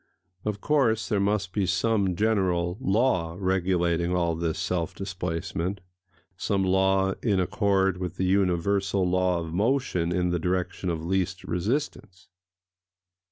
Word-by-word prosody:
Of 105 -2 -2
course 125 -7 +2
there 105 - +1
must 100 -1 0
be 100 -3 0
some 95 0 +1
general 90 -4 +1
law 95 -8 +1
regulating 90 -2 +1
all 85 -2 +1
this 80 -1 -2
self 85 -3 -2
displacement,—some 90 +1 -4
law 95 +1 +2
in 100 -5 +1
accord 95 0 +1
with 90 -3 -4
the 95 - -1
universal 95 +1 +1
law 90 -1 +1
of 80 -1 -6
motion 110 -3 +1
in - - -1
[Pg - - -1
207] 90 0 +1
the 90 - 0
direction 90 +1 -2
of 80 -1 -3
least 95 0 -1
resistance. 100 - -3
95 Hz, 135 wpm, -26 LUFS, 90-100 Hz, -, course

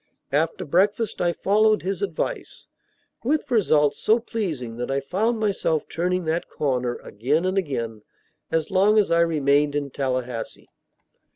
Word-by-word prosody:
After 155 +4 0
breakfast 200 +7 +1
I 175 - +2
followed 215 +4 +2
his 190 -1 -3
advice, 190 -6 -4 0.6
with 285 +2 0
results 150 -10 +3
so 220 - +4
pleasing 165 - -4
that 120 - -4
I 135 0 +1
found 210 - -1
myself 195 -7 0
turning 180 +1 -1
that 160 +2 -1
corner 125 -4 -1
again 140 - -1
and 185 +1 0
again 115 - -2 0.5
as 160 +1 -1
long 200 +3 +4
as 210 -4 +3
I 170 0 +4
remained 145 -3 +2
in 145 -2 -2
Tallahassee. 125 -3 -3
165 Hz, 145 wpm, -24 LUFS, 140-200 Hz, 0.6 s, so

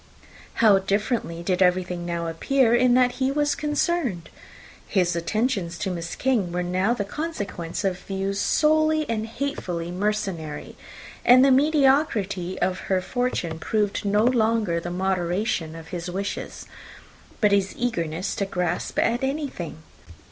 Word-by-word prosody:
How 210 -4 +5
differently 195 -3 -1
did 180 +1 0
everything 180 -1 +1
now 170 -1 -2
appear 230 +9 +2
in 245 0 +4
which 250 -1 +3
he 265 0 +1
was 295 +1 +1
concerned! 295 - -1 0.6
His 180 -3 +1
attentions 190 0 -1
to 190 - -2
Miss 170 -2 -5
King 235 -9 0
were 180 +1 -1
now 185 +6 +1
the 205 - -2
consequence 200 - -4
of 190 -2 -1
views 195 +1 -3
solely 310 0 +2
and 225 -1 -2
hatefully 190 - -4
mercenary; 185 -6 -3 0.5
and 255 +2 +7
the 275 - +5
mediocrity 265 - +2
of 185 0 0
her 190 -1 +3
fortune 185 -6 -2
proved 205 +3 -1
no 205 +1 +2
longer 225 -7 +2
the 175 - -5
moderation 180 -1 -1
of 165 0 -10
his 175 -1 -5
wishes, 195 +3 -5 0.7
but 210 -2 +3
his 195 -1 +1
eagerness 175 -8 -2
to 200 - -1
grasp 180 -2 -2
at 240 +3 +1
anything. 265 - -4
200 Hz, 140 wpm, -24 LUFS, 175-250 Hz, 0.7 s, and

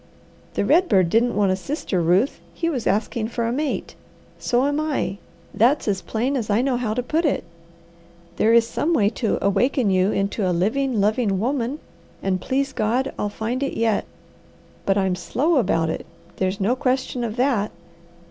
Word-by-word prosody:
The - - +1
red 360 +1 +4
bird 185 -3 +3
didn't 235 +2 +2
want 200 -2 +3
a - - +2
sister, 195 - -2
Ruth, 180 - +2 0.2
he 335 - -1
was 250 -7 -2
asking 215 +1 0
for 235 0 -2
a 230 - 0
mate. 285 +3 -2 0.5
So 245 +2 +1
am 290 +1 0
I. 275 - -2 0.3
That's 240 +8 +3
as 195 -2 0
plain 245 +5 -1
as 230 -5 -2
I 210 +4 +2
know 265 -2 +1
how 235 -3 -1
to 250 - -1
put 315 +7 0
it. 295 - +1 0.9
There 225 - +3
is 230 0 +6
some 330 +7 0
way 205 -6 +3
to 225 0 -1
awaken 240 +2 +2
you 185 +2 +3
into 195 0 0
a 175 - 0
living, 240 +6 0
loving 205 -1 +1
woman, 255 +3 -1 0.5
and, 185 -1 0
please 270 +5 -1
God, 245 +5 0
I'll 205 - 0
find 225 +5 -3
it 275 - -2
yet, 225 -2 +1 0.8
but 195 0 +3
I'm 190 -2 +1
slow 265 - 0
about 165 -9 +1
it; - - -4 0.3
there's 190 +1 -1
no 210 +6 +2
question 255 -2 -1
of 225 -2 -3
that. 240 -5 +1
230 Hz, 185 wpm, -22 LUFS, 200-265 Hz, 0.9 s, is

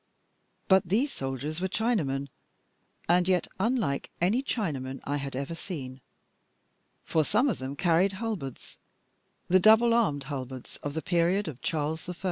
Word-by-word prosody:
But 190 -3 +4
these 250 +9 +2
soldiers 135 +5 -4
were 190 - +1
Chinamen, 170 - 0 0.8
and 175 +1 +4
yet 185 -2 +2
unlike 210 - 0
any 200 +9 +2
Chinamen 140 - -3
I 145 +1 -1
had 140 -2 -5
ever 140 +5 -3
seen; 140 -8 -7 1.0
for 160 - +2
some 220 - +2
of 230 - -1
them 135 +1 -5
carried 175 +4 +3
halberds, 190 - -5 0.7
the 185 +1 +5
double 220 +4 +6
armed 175 -12 +2
halberds 130 -3 -6
of 145 0 -5
the 160 - -2
period 180 +3 +2
of 135 -5 -7
Charles 160 +2 -2
I. 180 - -4
170 Hz, 145 wpm, -28 LUFS, 140-200 Hz, 1.0 s, double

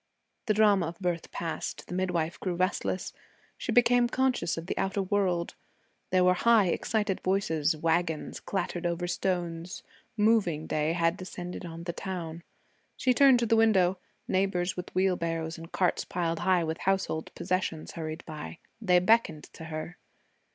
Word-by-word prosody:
The 215 - +2
drama 205 -5 +4
of 165 +3 -8
birth 175 -3 -2
passed, 165 -1 -4
the - - -8
midwife 175 -3 -1
grew 180 -2 -2
restless. 185 0 -1 0.4
She - - -4
became 245 0 +4
conscious 260 -10 0
of 165 - -5
the - - -3
outer 195 +1 -1
world. 185 -3 0 0.6
There 185 -1 +3
were 180 0 +5
high 215 0 +4
excited 210 0 -1
voices; 165 -5 +1
wagons 165 0 -1
clattered 175 -3 -2
over 170 +1 -2
stones; 175 -1 -2 0.3
moving 210 -8 +2
day 155 +1 0
had 170 +1 +1
descended 180 -1 -7
on 165 0 -8
the 170 0 -4
town. 170 -3 -5 0.6
She 255 - +3
turned 270 0 +6
to - - +2
the 225 0 +3
window. 190 -5 +4 0.3
Neighbors 185 -1 0
with 180 0 -6
wheelbarrows 165 -3 0
and 165 0 -10
carts 180 -2 +1
piled 165 -2 -2
high 180 -1 +3
with 160 0 -3
household 190 -4 -1
possessions 185 -4 -2
hurried 160 0 -6
by. 150 - -7 0.2
They 180 -5 +4
beckoned 180 -5 +3
to 160 - -9
her. 160 +2 -6
180 Hz, 155 wpm, -29 LUFS, 165-195 Hz, 0.6 s, turned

